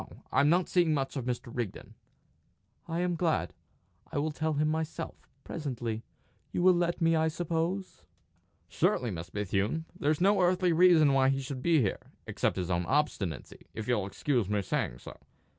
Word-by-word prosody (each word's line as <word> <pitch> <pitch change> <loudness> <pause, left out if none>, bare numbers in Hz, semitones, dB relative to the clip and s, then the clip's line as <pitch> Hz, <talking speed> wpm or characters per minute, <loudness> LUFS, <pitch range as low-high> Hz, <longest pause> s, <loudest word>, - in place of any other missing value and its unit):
"No; - - -14
I'm 145 +2 +4
not 175 +2 +3
seeing 170 -4 +3
much 135 0 -2
of 130 -4 -3
Mr. 120 -1 -4
Rigden." 120 -6 -5 0.9
"I 170 +1 -2
am 180 0 0
glad. 165 -1 0 0.6
I - - -3
will 155 +2 0
tell 155 +1 -1
him 150 +1 +1
myself, 160 +1 -4
presently. 120 -7 -4 0.5
You 175 - -1
will 185 0 +7
let 175 0 0
me, 165 0 +4
I 160 0 +2
suppose?" 170 +3 -2 0.7
"Surely, 120 -3 +1
Miss 85 -2 -6
Bethune. 105 - -1
There's 150 +1 0
no 195 +2 +4
earthly 180 -1 +3
reason 165 -4 +6
why 135 -1 +4
he 135 0 +1
should 130 -1 -5
be 165 0 +3
here, 95 - -1 0.3
except - - -1
his 90 -1 -2
own 85 0 0
obstinacy, 95 - -2
if 110 - -5
you'll 110 -6 +1
excuse 120 0 -1
my 105 -1 +1
saying - - -2
so. - - -11
150 Hz, 175 wpm, -30 LUFS, 115-170 Hz, 0.9 s, will